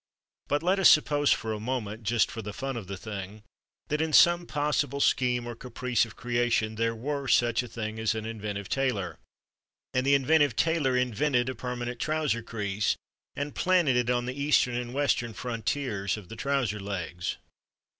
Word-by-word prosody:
But 145 +2 0
let 185 +3 +2
us 190 - +8
suppose 145 -1 +4
for 110 0 0
a 105 - -4
moment 110 -2 -3
(just 110 0 +1
for 115 - -5
the 105 -1 -6
fun 135 +4 -4
of 110 -6 -6
the 95 0 -5
thing) 105 0 -7 0.5
that 150 +1 0
in 160 -1 -1
some 175 +2 +6
possible 145 -1 0
scheme 125 -3 +2
or 120 - -5
caprice 125 0 -1
of 110 -1 -13
creation 120 -2 0
there 115 +1 0
were 140 +4 -3
such 120 -2 +3
a 125 - -7
thing 110 -1 -5
as 110 0 +1
an 110 0 -4
inventive 105 -3 -5
tailor. 125 -9 -1 0.7
And 125 - +1
the 140 +1 +4
inventive 145 -2 +3
tailor 150 -5 +2
invented 125 +1 +1
a - - -2
permanent 120 0 -5
trouser 150 -4 0
crease 105 -3 -1 0.4
and 145 +1 -3
planted 175 -8 +3
it 125 -1 +1
on 120 -1 +1
the 125 - -3
Eastern 140 -2 +2
and 120 0 -3
Western 130 -4 0
frontiers 115 -4 -2
of 100 -4 -11
the - - -7
trouser 125 -4 -1
legs. 90 -3 -4
120 Hz, 180 wpm, -28 LUFS, 110-140 Hz, 0.7 s, us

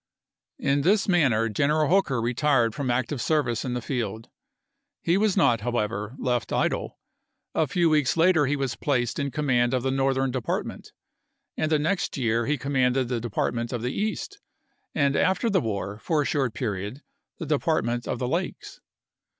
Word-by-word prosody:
In 140 +1 +1
this 205 +7 +3
manner 135 - +3
General 150 +8 +1
Hooker 170 -8 +2
retired 120 0 +2
from 140 -1 -3
ac 120 +1 +1
tive 140 -5 -3
service 135 -7 0
in 125 -2 -3
the 120 - -4
field. 115 -3 -3 0.7
He 170 - +2
was 205 0 +2
not, 120 -6 +3
however, 110 -1 -2
left 125 -3 -1
idle. - - -1 0.6
A 155 - +1
few 170 +5 +2
weeks 150 -1 +2
later 165 -3 +4
he 145 - +1
was 135 -4 -2
placed 125 -1 -1
in 140 -1 -1
com 150 +3 -3
mand 120 -1 +2
of 125 - -1
the 135 - 0
Northern 135 0 +1
Department; 125 -3 -4 0.6
in 155 - -1
the 155 - +3
next 165 +4 -1
year 115 -2 0
he 150 - +1
commanded 130 -2 +1
the 125 -2 -1
Department 115 +1 -2
of 120 -2 -3
the 125 - -2
East, 220 - -3 0.6
and 140 -2 +2
after 190 +5 +2
the 190 -3 +3
war 100 -2 -3
for 150 +4 0
a - - -5
short 130 -6 0
period 105 +3 -4 0.3
the 165 - -5
Depart 155 -1 +1
ment 120 0 -2
of - - -2
the 125 - -2
Lakes. - - -3
130 Hz, 180 wpm, -25 LUFS, 120-150 Hz, 0.7 s, later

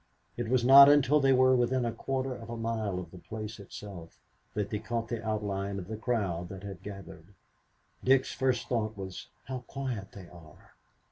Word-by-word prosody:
It 120 -2 -3
was 125 -1 +2
not 140 +2 +10
until 145 0 +5
they 135 -1 +4
were 130 0 +5
within 125 0 +1
a 115 - 0
quarter 130 +3 -3
of 115 -2 -10
a 115 - -5
mile 110 -4 -2
of 90 - -6
the 90 - -11
place 110 +3 -7
itself 95 -4 -10 0.4
that 105 -1 -2
they 105 - -1
caught 115 +1 -3
the 115 -2 -3
outline 100 -2 -2
of 95 - -6
the 110 - -4
crowd 100 -7 -2
that 95 0 -9
had 95 -3 -8
gathered. 100 -2 -10 0.7
Dick's 130 0 +3
first 130 -2 0
thought 110 -3 -1
was, 95 -2 -7 0.2
"How 130 0 -4
quiet 125 -8 -5
they 95 -3 -10
are!" 85 -3 -16
110 Hz, 190 wpm, -30 LUFS, 100-125 Hz, 0.7 s, not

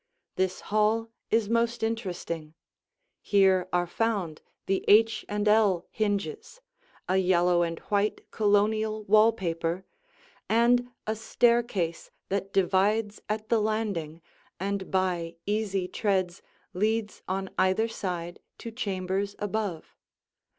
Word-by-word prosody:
This 185 0 -1
hall 220 +2 +2 0.2
is 225 -2 +2
most 235 +1 0
interesting; 175 -8 -3 0.7
here 190 -2 +3
are 175 0 +2
found 190 -4 -2 0.2
the 195 - 0
H 225 +1 +5
and 210 0 -1
L 210 -5 +3
hinges, 420 - -2 0.5
a 185 - +2
yellow 180 -1 +3
and 165 -1 -1
white 205 +1 -1
Colonial 215 +1 +1
wall 215 +2 +5
paper, 170 -3 -3 0.6
and 245 +2 +3 0.2
a 220 - -1
staircase 225 -6 +1 0.2
that 195 0 -2
divides 200 +3 +1
at 215 0 -3
the 230 -2 +3
landing 200 -8 -2 0.4
and 195 0 -3
by 180 -3 -1
easy 205 -3 -1
treads 185 -2 -1 0.3
leads 215 +3 -1
on 190 +1 -3
either 190 +4 +3
side 175 -6 -5 0.2
to 230 - -7
chambers 200 -3 -2
above. 205 -5 -3
200 Hz, 115 wpm, -27 LUFS, 185-220 Hz, 0.7 s, H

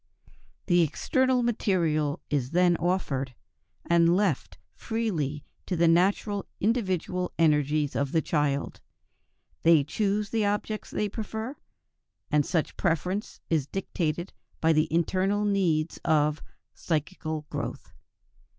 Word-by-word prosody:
The 175 -2 +4
external 255 - +1
material 170 -10 0
is 135 -4 0
then 175 +2 +3
offered, 140 -8 -1 0.5
and 170 0 +4
left 190 -9 0 0.2
freely 165 - -2 0.2
to 185 - -1
the 170 0 +3
natural 195 +4 +2
individual 185 -5 0
energies 150 -2 +2
of 140 -1 0
the 165 - +2
children. 145 -3 0 0.9
They 165 -3 +5
choose 200 +6 -1
the 225 -2 +1
objects 210 +1 -2
they 210 - -1
prefer; 220 +5 -5 0.8
and 150 -1 +4
such 160 +1 -1
preference 180 +4 -1
is 150 -4 +1
dictated 175 -2 -3 0.3
by 160 0 +3
the 155 +1 +1
internal 190 +5 +1
needs 175 -6 +1
of 150 -2 +2 0.3
"psychical 155 -1 -3
growth." - - -5
170 Hz, 115 wpm, -27 LUFS, 155-200 Hz, 0.9 s, They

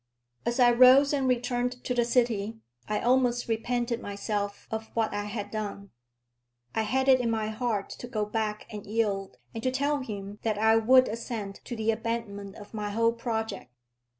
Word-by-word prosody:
As 235 +2 0
I 245 -1 +7
rose 255 +4 +7
and 270 -2 +1
returned 245 0 0
to 250 - -1
the 240 -1 +2
city, 230 -3 +1 0.3
I 210 - 0
almost 245 0 +2
repented 235 +1 -1
myself 205 0 -3
of 220 0 -3
what 225 -1 +1
I 205 0 -2
had 205 -1 -5
done. 205 -2 -5 0.8
I 220 - +1
had 265 +5 0
it 260 -1 +6
in 235 - 0
my 220 -1 -1
heart 220 -3 -2
to 245 - -6
go 215 -3 -1
back 210 0 -2
and 210 -2 -7
yield, 205 -3 -1 0.2
and 225 - -5
to 255 - +1
tell 285 +3 0
him 205 -4 -6
that 220 -2 0
I 220 +1 +4
would 255 +3 +6
assent 220 -3 -5
to 240 - -5
the 220 0 +1
abandonment 220 -3 -4
of 205 +1 -12
my 210 -1 -3
whole 230 +2 +2
project. 225 - -3
225 Hz, 180 wpm, -28 LUFS, 210-245 Hz, 0.8 s, I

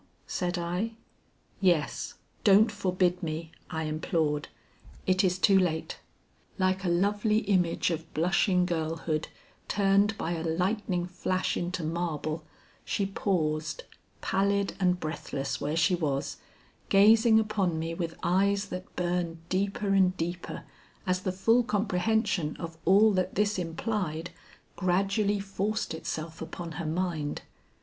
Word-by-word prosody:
said 180 0 -2
I. 180 +6 -2 0.7
"Yes, 175 -6 +1 0.3
don't 210 +1 +6
forbid 185 -3 +1
me," 160 -1 -4 0.2
I 160 0 -2
implored; 155 -1 -1 0.6
"it 185 +1 +3
is 185 -1 +2
too 195 +1 +5
late." 160 -4 -1 0.6
Like 190 0 +1
a 180 - +1
lovely 205 +5 +2
image 185 -4 +1
of 165 0 -4
blushing 180 +2 +3
girlhood 160 -2 -2 0.4
turned 200 +2 +3
by 165 - -2
a 165 -2 -2
lightning 180 +2 0
flash 185 +1 -1
into 175 0 -2
marble, 160 -1 -2 0.4
she 200 - -1
paused, 175 - -1 0.4
pallid 200 +1 +1
and 180 -1 +2
breathless 145 -4 -4
where 150 +2 -1
she 180 +3 +3
was, 145 -6 -1 0.5
gazing 220 +3 +6
upon 200 -6 0
me 165 +1 -2
with 165 -1 -4
eyes 200 +3 +2
that 185 +1 -7
burned 175 -2 -2
deeper 200 +2 0
and 190 -1 +3
deeper 175 +2 -4 0.4
as 185 -1 0
the 185 - -1
full 225 +6 +3
comprehension 205 -6 0
of 165 -1 -6
all 210 +3 +6
that 185 -2 0
this 210 0 +1
implied 175 -1 -2 0.4
gradually 195 +3 +1
forced 200 +1 -2
itself 160 0 -5
upon 170 -2 -6
her 165 0 -4
mind. 160 -3 -2
180 Hz, 125 wpm, -29 LUFS, 165-200 Hz, 0.7 s, don't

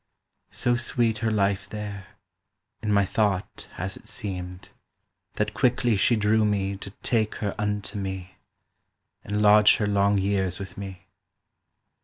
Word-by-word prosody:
So 120 0 0
sweet 120 -2 +1
her 115 0 0
life 100 -2 0
there 105 -2 -6 0.7
(in 105 -1 -1
my 100 -1 +4
thought 100 -1 -1
has 95 +2 -4
it - - -14
seemed) 90 -2 -6 0.7
That 105 0 -1
quickly 120 -1 +2
she 120 +4 +3
drew 110 +1 +3
me 100 -2 0
To 100 - -8
take 110 -3 +1
her 100 -2 -2
unto 105 0 -1
me, 95 -1 -5 0.9
And 105 +1 -1
lodge 105 0 +7
her 105 - 0
long 100 0 +2
years 95 -2 0
with 95 -1 -8
me. 95 -2 -8
100 Hz, 140 wpm, -26 LUFS, 95-105 Hz, 0.9 s, lodge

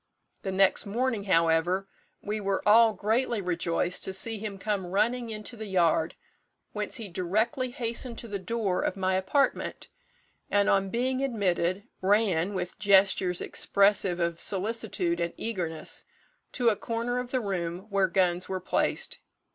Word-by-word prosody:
The 195 - -3
next 195 +1 +3
morning, 230 -1 -1
however, 170 +1 +2 0.4
we 210 +1 -2
were 195 -1 -2
all 225 +1 +7
greatly 225 +3 0
rejoiced 175 -1 -1
to 190 - -4
see 220 +3 0
him 205 -2 -5
come 195 -2 -2
running 230 +6 0
into 215 +2 -6
the 220 -1 -7
yard, 170 -4 +2 0.6
whence 210 -1 -2
he 225 -4 -3
directly 215 - -1
hastened 235 0 -1
to 235 - -6
the 205 -2 -4
door 200 -2 -1
of - - -2
my 190 0 0
apartment, 190 +10 0 0.6
and, 205 0 +2
on 195 0 +2
being 255 +4 0
admitted, 195 -7 0 0.2
ran, 195 -2 +2
with 180 -1 -4
gestures 190 -3 +4
expressive 195 -3 +2
of 170 -1 -1
solicitude 195 -4 -1
and 170 0 -2
eagerness, 170 -8 -3 0.5
to 245 -3 +3
a 215 - +1
corner 230 +4 -2
of 250 -1 -5
the 255 - 0
room 180 -5 -3
where 195 -1 +3
guns 180 0 +1
were 190 -1 -2
placed. 180 - -1
200 Hz, 150 wpm, -28 LUFS, 180-225 Hz, 0.6 s, all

